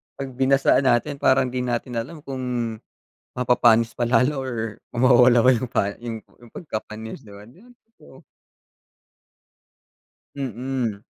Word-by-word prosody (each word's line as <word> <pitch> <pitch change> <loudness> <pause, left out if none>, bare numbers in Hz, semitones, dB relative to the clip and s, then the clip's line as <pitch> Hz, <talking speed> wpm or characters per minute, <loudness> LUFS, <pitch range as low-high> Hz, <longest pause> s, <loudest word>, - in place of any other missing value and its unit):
'Pag 135 -1 -6
binasaan 135 +1 +3
natin 140 +4 +1
parang 130 0 +3
di 125 - -3
natin 120 -1 -2
alam 145 +8 -7
kung 130 -1 -6 0.9
mapapanis 120 -2 +3
pa 120 - -1
lalo 130 +4 +2
or 130 -2 -4 0.4
mawawala 125 -1 +5
ba 130 - +6
yung 120 +1 -4
pa - - +2 0.2
yung 115 -2 -5 0.2
yung 120 -2 -17
pagkapanis, 110 -3 -7
'di 105 - -15
ba? 100 - -12
Di 140 +10 -19
ba, 245 - -19 0.4
oo. - - -17 2.1
Mm. 125 -4 -3
125 Hz, 135 wpm, -23 LUFS, 115-135 Hz, 2.1 s, ba